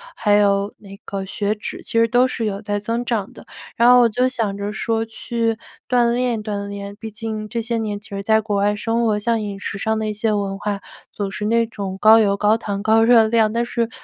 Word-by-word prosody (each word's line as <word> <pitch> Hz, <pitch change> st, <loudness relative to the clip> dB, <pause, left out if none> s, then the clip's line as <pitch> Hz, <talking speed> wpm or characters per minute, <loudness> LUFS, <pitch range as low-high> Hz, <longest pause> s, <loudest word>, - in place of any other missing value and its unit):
还 205 Hz, -, +1 dB
有 200 Hz, 0 st, +2 dB
那 195 Hz, -1 st, -12 dB
个 195 Hz, -1 st, -4 dB
血 205 Hz, +2 st, -2 dB
脂， 210 Hz, -, -7 dB
其 -, -, -9 dB
实 230 Hz, -, +4 dB
都 245 Hz, +2 st, +3 dB
是 230 Hz, -3 st, -3 dB
有 200 Hz, -1 st, -3 dB
在 205 Hz, -1 st, -2 dB
增 230 Hz, +3 st, -2 dB
长 225 Hz, -5 st, -2 dB
的。 -, -, -14 dB, 0.3 s
然 235 Hz, +1 st, +5 dB
后 250 Hz, 0 st, +8 dB
我 240 Hz, -, +5 dB
就 250 Hz, +4 st, +1 dB
想 225 Hz, -6 st, -2 dB
着 200 Hz, +1 st, -3 dB
说 225 Hz, +1 st, -1 dB
去 225 Hz, 0 st, -2 dB, 0.3 s
锻 240 Hz, -2 st, +3 dB
炼 240 Hz, -2 st, 0 dB
锻 205 Hz, -1 st, -4 dB
炼， 200 Hz, 0 st, -7 dB
毕 225 Hz, -, -6 dB
竟 215 Hz, -1 st, -5 dB
这 235 Hz, -, -3 dB
些 230 Hz, +1 st, -2 dB
年 210 Hz, -2 st, -3 dB
其 205 Hz, -, -16 dB
实 200 Hz, -1 st, -5 dB
在 220 Hz, +2 st, +3 dB
国 210 Hz, -1 st, -2 dB
外 205 Hz, +1 st, +2 dB
生 230 Hz, +2 st, -1 dB
活， 215 Hz, -2 st, +2 dB
像 225 Hz, +1 st, 0 dB
饮 200 Hz, -1 st, -5 dB
食 195 Hz, -, -4 dB
上 220 Hz, +1 st, 0 dB
的 220 Hz, -, -2 dB
一 -, -, -2 dB
些 220 Hz, +1 st, 0 dB
文 200 Hz, -1 st, -2 dB
化， 205 Hz, -1 st, -3 dB, 0.3 s
总 200 Hz, -1 st, -4 dB
是 210 Hz, -, -4 dB
那 230 Hz, +1 st, +2 dB
种 200 Hz, -4 st, -6 dB
高 220 Hz, +1 st, +7 dB
油 200 Hz, -2 st, +2 dB
高 210 Hz, +2 st, +3 dB
糖 200 Hz, -3 st, -4 dB
高 220 Hz, +1 st, +4 dB
热 230 Hz, -1 st, +6 dB
量。 220 Hz, -1 st, +2 dB
但 235 Hz, +1 st, 0 dB
是， 235 Hz, -1 st, -1 dB
215 Hz, 260 characters per minute, -20 LUFS, 205-230 Hz, 0.3 s, 后